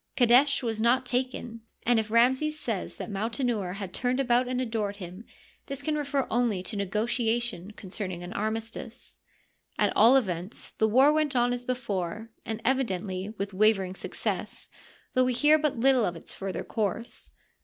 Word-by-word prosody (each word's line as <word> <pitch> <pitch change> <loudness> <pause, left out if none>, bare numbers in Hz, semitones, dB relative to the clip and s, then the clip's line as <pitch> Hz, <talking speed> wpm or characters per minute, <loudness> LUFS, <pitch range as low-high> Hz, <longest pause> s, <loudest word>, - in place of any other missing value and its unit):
Qadesh 255 +3 +5
was 225 -2 -2
not 250 +3 +3
taken, 245 -2 -3 0.2
and 240 -1 +3
if 220 -1 -3
Ramses 260 +7 +3
says 220 -6 -3
that - - -6
Mautenouer 220 -2 -1
had 195 -2 -6
turned 255 +1 0
about 250 -1 +3
and 255 0 -1
adored 220 -5 -2
him, 185 +2 -9 0.4
this 275 0 -5
can 310 - 0
refer 285 -2 0
only 225 -6 +1
to 210 - -5
negotiations 220 0 -1
concerning 185 -2 -6
an 175 - -7
armistice. 225 +2 -4 0.6
At - - +2
all 235 +5 +7
events, 185 -5 -3
the 220 - +1
war 265 +7 +5
went 305 -3 +1
on 245 0 +3
as 245 0 -5
before, 220 -4 -3 0.2
and 220 -1 -3
evidently 195 -7 0
with 200 0 -4
wavering 195 -2 +3
success, - - -4 0.4
though 255 0 +4
we 255 - +1
hear 295 +6 +5
but 300 -4 0
little 260 -2 +4
of 175 - -2
its 165 - -9
further 195 -1 -4
course. 220 +1 -3
230 Hz, 165 wpm, -28 LUFS, 200-255 Hz, 0.6 s, all